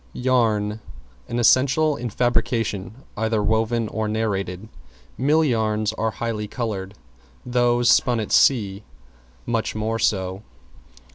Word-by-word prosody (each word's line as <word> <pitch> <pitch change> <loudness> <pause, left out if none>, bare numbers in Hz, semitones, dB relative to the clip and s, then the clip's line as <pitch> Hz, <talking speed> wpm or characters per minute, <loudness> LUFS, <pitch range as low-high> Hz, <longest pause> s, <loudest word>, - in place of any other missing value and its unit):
=YARN= 110 -4 +1 0.5
An 120 - -3
essential 135 +5 +3
in 120 -2 -4
fabrication 115 -1 -1
either 110 -1 0
woven 110 +1 +1
or 110 -1 -2
narrated. 105 -3 -2 0.5
Mill 150 +5 +2
yarns 110 -4 0
are 110 0 -1
highly 110 -1 -4
colored; 105 -4 -4 0.5
those 120 -1 +2
spun 120 -3 +3
at 110 - -4
sea 105 -6 +3 0.6
much 115 -2 -2
more 110 +1 -2
so. 95 -2 0
110 Hz, 115 wpm, -22 LUFS, 105-120 Hz, 0.6 s, essential